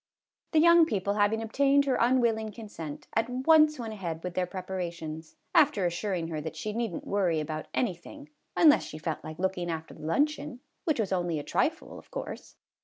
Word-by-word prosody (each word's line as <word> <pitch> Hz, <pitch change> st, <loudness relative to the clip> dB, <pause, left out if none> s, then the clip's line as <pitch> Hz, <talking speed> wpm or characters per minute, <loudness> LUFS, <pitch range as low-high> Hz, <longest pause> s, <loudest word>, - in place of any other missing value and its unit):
The 315 Hz, -, +5 dB
young 340 Hz, 0 st, +7 dB
people, 200 Hz, -, -1 dB
having 210 Hz, +2 st, +2 dB
obtained 280 Hz, +5 st, +3 dB
her 270 Hz, -, +1 dB
unwilling 230 Hz, -3 st, +2 dB
consent, 180 Hz, -9 st, -8 dB
at 225 Hz, +1 st, +1 dB
once 305 Hz, +4 st, +4 dB
went 225 Hz, -3 st, -5 dB
ahead 170 Hz, -6 st, -5 dB
with 180 Hz, -, -4 dB
their 180 Hz, 0 st, 0 dB
preparations, 170 Hz, -4 st, -6 dB, 0.2 s
after 295 Hz, -, +4 dB
assuring 175 Hz, -1 st, -2 dB
her 155 Hz, -2 st, -3 dB
that 160 Hz, +1 st, -6 dB
she 210 Hz, +7 st, -4 dB
need 230 Hz, 0 st, -1 dB
n't 295 Hz, -1 st, -7 dB
worry 190 Hz, -, +1 dB
about 155 Hz, 0 st, -4 dB
any 235 Hz, -7 st, 0 dB
thing, 290 Hz, -, -13 dB, 0.3 s
unless 310 Hz, -3 st, +7 dB
she 155 Hz, -, -8 dB
felt 160 Hz, 0 st, -4 dB
like 155 Hz, 0 st, -7 dB
looking 180 Hz, -1 st, -1 dB
after 160 Hz, -1 st, -5 dB
the -, -, -14 dB
luncheon, 285 Hz, -, 0 dB, 0.3 s
which 310 Hz, -6 st, +1 dB
was 205 Hz, -4 st, -1 dB
only 175 Hz, -3 st, 0 dB
a 145 Hz, -, -4 dB
trifle, -, -, -1 dB
of -, -, -18 dB
course. -, -, -7 dB
205 Hz, 190 wpm, -29 LUFS, 170-260 Hz, 0.3 s, young